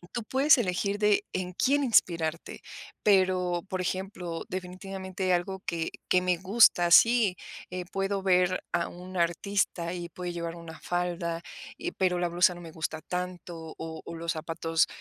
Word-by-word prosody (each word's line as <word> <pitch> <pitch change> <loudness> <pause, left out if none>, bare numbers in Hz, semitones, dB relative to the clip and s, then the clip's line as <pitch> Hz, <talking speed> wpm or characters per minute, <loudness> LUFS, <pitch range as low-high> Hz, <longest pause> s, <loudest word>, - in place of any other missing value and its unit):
Tú 235 - -2
puedes 270 +5 +5
elegir 200 -1 0
de 210 -1 +3
en 185 -1 -3
quién 280 +7 +2
inspirarte, 170 -8 +1 0.4
pero 185 -3 +3
por 185 - -2
ejemplo, 185 -2 -4
definitivamente 190 0 -4
algo 190 +2 -1
que 165 -1 -2 0.2
que 180 - +4
me 180 -1 +2
gusta. 185 -3 +4
Sí, 225 -3 +6 0.6
puedo 195 0 -1
ver 185 -1 +3
a 170 -1 0
un 180 +1 -10
artista 170 0 0
y 175 -1 -5
puede 175 +1 -5
llevar 170 0 -4
una 165 -1 -10
falda 175 -1 -2 0.4
y 355 +1 -4
pero 180 -2 +1
la 175 - +1
blusa 175 +1 +3
no 175 - -11
me 165 -1 -9
gusta 160 -1 -3
tanto 175 -2 -5
o 160 -1 -6
o 170 - -7
los 165 0 -2
zapatos 165 0 0
180 Hz, 155 wpm, -28 LUFS, 170-190 Hz, 0.6 s, Sí